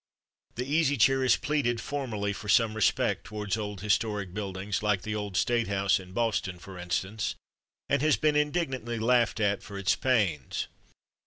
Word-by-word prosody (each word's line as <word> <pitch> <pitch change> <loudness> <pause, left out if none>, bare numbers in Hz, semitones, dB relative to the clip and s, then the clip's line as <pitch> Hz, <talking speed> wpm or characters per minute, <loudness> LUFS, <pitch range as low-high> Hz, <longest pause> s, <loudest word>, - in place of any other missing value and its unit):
The 125 - -2
Easy 145 0 +2
Chair 135 +4 +4
has 130 -3 +5
pleaded 135 -6 0
formerly 115 -8 -3
for 105 +1 -8
some 110 0 +4
respect 110 -3 +1
towards 105 +1 -3
old 105 -3 -5
historic 105 -2 0
buildings, 100 -1 -3
like 105 -3 +1
the 110 - -3
old 105 -3 -3
State 120 +2 +2
house 100 -1 +2
in 90 -1 -11
Boston, 100 -4 -1
for 90 +1 -10
instance, 95 +4 -2 0.5
and - - +1
has 155 0 +3
been 150 -1 +2
indignantly 140 -6 0
laughed 120 +1 +2
at 100 -2 +1
for 100 -1 -9
its 100 -1 +2
pains. 100 - 0
105 Hz, 165 wpm, -28 LUFS, 100-125 Hz, 0.5 s, has